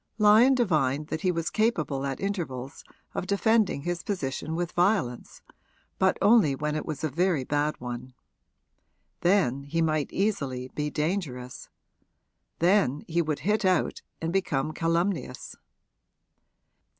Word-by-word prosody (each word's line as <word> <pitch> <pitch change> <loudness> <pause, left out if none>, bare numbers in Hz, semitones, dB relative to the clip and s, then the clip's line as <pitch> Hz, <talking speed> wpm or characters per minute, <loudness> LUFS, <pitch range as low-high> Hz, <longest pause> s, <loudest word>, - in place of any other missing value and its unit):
Lyon 220 +5 +6
divined 155 - +1
that 155 - -3
he 185 -2 +2
was 165 -1 -2
capable 155 - 0
at 135 - -4
intervals 155 -10 -4 0.3
of 185 - -3
defending 205 -6 +2
his 175 +1 -2
position 160 -4 -3
with 175 0 -2
violence, 175 - 0 0.6
but 190 0 +3
only 205 -10 +5
when 150 +2 -2
it 155 - -3
was 155 -2 -5
a 155 - +1
very 170 -2 +1
bad 145 +3 -1
one. 125 +1 -7 1.0
Then 175 -8 +2
he 165 +4 -2
might 155 -3 +1
easily 135 -11 -1
be 150 0 -2
dangerous 150 -6 -3 0.9
then 170 -6 +2
he 170 +1 +1
would 155 -3 -2
hit 210 +5 +1
out 185 -4 +1 0.2
and 165 +1 -3
become 155 -7 0
calumnious. 165 -4 -1
165 Hz, 130 wpm, -27 LUFS, 140-195 Hz, 1.0 s, Lyon